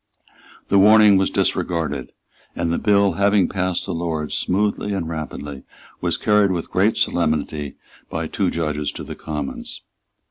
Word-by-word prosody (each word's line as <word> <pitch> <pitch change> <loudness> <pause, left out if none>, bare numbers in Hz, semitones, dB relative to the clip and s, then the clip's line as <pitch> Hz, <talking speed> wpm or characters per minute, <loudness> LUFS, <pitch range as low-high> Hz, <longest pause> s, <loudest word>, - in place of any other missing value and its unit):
The 100 - +5
warning 105 0 +7
was 95 - +2
disregarded; 80 -6 -1 0.4
and 85 -1 -1
the - - 0
bill, 100 -2 +3
having 100 +2 +3
passed 90 -2 -1
the 95 - -3
Lords 80 -2 -3
smoothly 105 +1 0
and 85 -4 -3
rapidly, 75 -3 -6 0.4
was - - 0
carried 105 -1 +3
with 90 -3 -3
great 100 +4 +2
solemnity 75 -3 -1 0.3
by - - -3
two - - -1
judges 75 -3 -2
to - - -7
the - - -7
Commons. 75 -3 -5
85 Hz, 145 wpm, -21 LUFS, 80-100 Hz, 0.4 s, warning